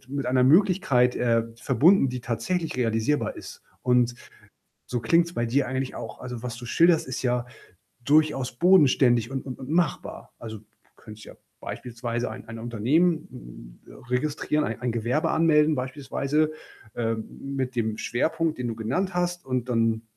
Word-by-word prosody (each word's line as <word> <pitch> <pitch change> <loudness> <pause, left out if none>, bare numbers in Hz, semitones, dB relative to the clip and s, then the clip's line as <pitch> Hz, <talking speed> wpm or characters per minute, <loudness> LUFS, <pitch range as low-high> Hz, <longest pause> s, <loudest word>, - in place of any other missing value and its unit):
mit 140 0 -3
einer 125 0 +3
Möglichkeit, 145 -6 +4
äh, 115 -2 +2
verbunden, 140 - +4
die 125 0 -4
tatsächlich 165 +9 -2
realisierbar 115 +3 0
ist. - - -10 0.2
Und 125 -1 +2 0.7
so 125 - -2
klingt's 170 +9 +2
bei 120 - -1
dir 135 +5 +1
eigentlich 130 0 -3
auch. - - -8
Also, 125 -2 -7
was 125 -1 -5
du 120 0 -9
schilderst, 165 +5 +3
ist 130 - -4
ja 125 -1 0 0.6
durchaus 150 -3 +2
bodenständig 130 - +4
und 135 -1 -4
und 130 - -6
und 130 - -9
machbar. 170 -1 -1
Also, 110 -2 -8
k - - -25 0.3
könntest 110 0 -12
ja - - -11 0.3
beispielsweise 120 -1 -4
ein-ein 110 +1 -9
Unternehmen 135 +10 +1 0.6
m - - -14
äh, - - -13 0.2
registrieren, 150 +3 0
ein 115 - -4
ein 125 -1 -1
Gewerbe 120 +6 0
anmelden, 155 -1 +4
beispielsweise, 140 +3 -1 0.4
ähm, 115 -1 -2 0.3
mit 130 -1 -3
dem 110 -2 -1
Schwerpunkt, 160 +6 -1
den 125 - -2
du 115 - -3
genannt 155 - -1
hast 175 -1 -1
und 125 -1 -2
dann 115 -2 +1
125 Hz, 160 wpm, -25 LUFS, 120-155 Hz, 0.7 s, Möglichkeit